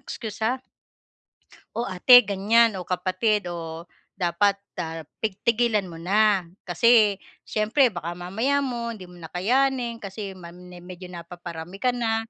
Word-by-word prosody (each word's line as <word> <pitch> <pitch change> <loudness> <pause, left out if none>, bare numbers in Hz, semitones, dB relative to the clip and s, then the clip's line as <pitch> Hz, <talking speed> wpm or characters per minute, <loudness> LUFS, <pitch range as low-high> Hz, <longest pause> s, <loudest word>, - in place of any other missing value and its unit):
excuse 220 -1 -7
ah. 250 +4 +1 1.2
O 235 - -1
ate 245 +7 +8
ganyan, 210 +1 +3
o 180 - -6
kapatid, 185 +2 0
o 165 0 -7 0.2
dapat, 195 +2 +1 0.2
ah, 165 -2 -4 0.2
pig 215 -3 -2
tigilan 235 -2 +2
mo 165 - -9
na 195 +2 +2 0.2
kasi, 215 +2 +5 0.3
siyempre 225 +5 +3
baka 175 -4 -5
mamaya 220 +11 -1
mo 235 -3 -3
hindi 185 -4 -11
mo 180 - -14
na 170 - -10
kayanin 240 +7 0
kasi 200 -2 -7
ma 170 -1 -11
me 180 0 -13
medyo 180 0 -9
napaparami 175 +1 -9
ka 255 - +3
na. 225 -2 -1
200 Hz, 145 wpm, -25 LUFS, 180-230 Hz, 1.2 s, ate